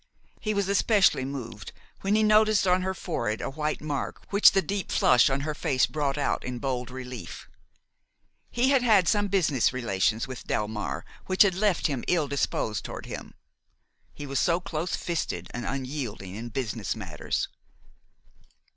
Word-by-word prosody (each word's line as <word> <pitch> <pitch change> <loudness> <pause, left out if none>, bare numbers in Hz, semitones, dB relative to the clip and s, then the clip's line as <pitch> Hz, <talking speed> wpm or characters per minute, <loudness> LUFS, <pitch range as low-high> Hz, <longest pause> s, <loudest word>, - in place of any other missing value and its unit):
He 215 -2 -2
was 200 -1 +1
especially 200 - +3
moved 115 -6 -7 0.3
when 200 +2 +1
he 215 - +3
noticed 215 -1 +4
on 180 0 +3
her 190 +1 -2
forehead 115 - -2
a - - -4
white 150 +1 -2
mark 145 -2 -4
which 200 +1 +7
the 195 - +3
deep 200 -1 -3
flush 125 - +5
on 135 +1 0
her 155 +2 -2
face 135 -3 +1
brought 145 -2 -2
out 145 - 0
in 125 -1 -4
bold 125 -1 -3
relief. 125 -2 -8 1.0
He 250 +3 +2
had 270 -2 +4
had 210 -7 +4
some 205 -1 +2
business 165 - +2
relations 115 -2 0
with 130 -2 -8
Delmare 105 -9 -2 0.2
which 185 +2 +6
had 195 -2 +2
left 195 -1 +1
him 135 -5 0
ill 165 -5 +2
disposed 120 -6 -1
toward - - -7
him; - - -8 0.8
he 145 - -8
was 135 -2 -1
so 170 +10 +2
close 175 -2 -3
fisted 90 - -3
and 120 - -4
unyielding 130 -8 -4
in 115 +4 -6
business 120 -2 -3
matters. - - -3
145 Hz, 165 wpm, -27 LUFS, 125-190 Hz, 1.0 s, which